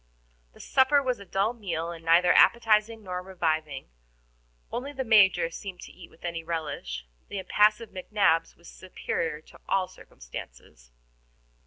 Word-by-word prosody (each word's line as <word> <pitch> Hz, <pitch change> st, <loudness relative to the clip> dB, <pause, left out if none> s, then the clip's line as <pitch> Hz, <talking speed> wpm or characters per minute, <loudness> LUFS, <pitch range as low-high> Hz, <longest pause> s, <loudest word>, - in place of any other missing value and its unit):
The -, -, -19 dB
supper 270 Hz, +2 st, +3 dB
was 255 Hz, -3 st, -1 dB
a 200 Hz, -, -11 dB
dull 195 Hz, +5 st, 0 dB
meal, 170 Hz, -7 st, -4 dB
and 165 Hz, -1 st, -10 dB
neither 170 Hz, +2 st, +5 dB
appetizing 225 Hz, -1 st, +4 dB
nor 180 Hz, -2 st, -4 dB
reviving. 160 Hz, -6 st, -2 dB, 0.9 s
Only 275 Hz, +4 st, -4 dB
the 265 Hz, -1 st, -3 dB
Major 205 Hz, -7 st, +4 dB
seemed 190 Hz, 0 st, -8 dB
to -, -, -10 dB
eat 180 Hz, -2 st, -14 dB
with 170 Hz, -, -14 dB
any 170 Hz, -1 st, -4 dB
relish. 150 Hz, -, -4 dB, 0.2 s
The 205 Hz, -, -5 dB
impassive 210 Hz, +4 st, +2 dB
McNabbs 185 Hz, -3 st, +1 dB
was 170 Hz, -, -17 dB
superior 165 Hz, -4 st, -4 dB
to -, -, -18 dB
all 190 Hz, -1 st, +2 dB
circumstances. -, -, -12 dB
185 Hz, 145 wpm, -27 LUFS, 165-215 Hz, 0.9 s, neither